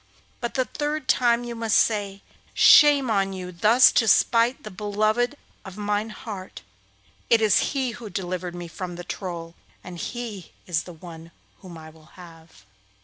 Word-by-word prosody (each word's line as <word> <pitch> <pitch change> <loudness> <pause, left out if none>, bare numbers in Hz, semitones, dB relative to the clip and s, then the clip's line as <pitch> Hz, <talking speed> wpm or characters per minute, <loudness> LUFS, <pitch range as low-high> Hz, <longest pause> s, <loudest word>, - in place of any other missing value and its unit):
But 240 - -5
the 255 - +1
third 295 +2 -4
time 240 -1 +2
you 240 0 -6
must 225 -2 +1
say, 200 -3 0 0.3
"Shame 285 -5 +6
on 195 -2 0
you 180 -1 -7
thus 215 +9 +5
to 225 - +2
smite 230 +4 +3
the 215 - -8
beloved 215 +6 -1 0.3
of 190 0 -11
mine 210 +1 -2
heart. 205 -3 -9 0.7
It 230 - +5
is 215 -3 +3 0.2
he 260 -3 -1
who 230 -1 -9
delivered 180 -1 -5
me 175 -1 -7
from 175 +1 -7
the 175 - -8
Troll, 170 -3 -6 0.3
and 175 -1 -9
he 225 -6 -7
is 170 -3 -2
the 180 - -10
one 165 0 -12 0.3
whom 180 -4 -11
I 160 0 -12
will 155 -1 -20
have." 165 - -15
205 Hz, 165 wpm, -24 LUFS, 175-235 Hz, 0.7 s, Shame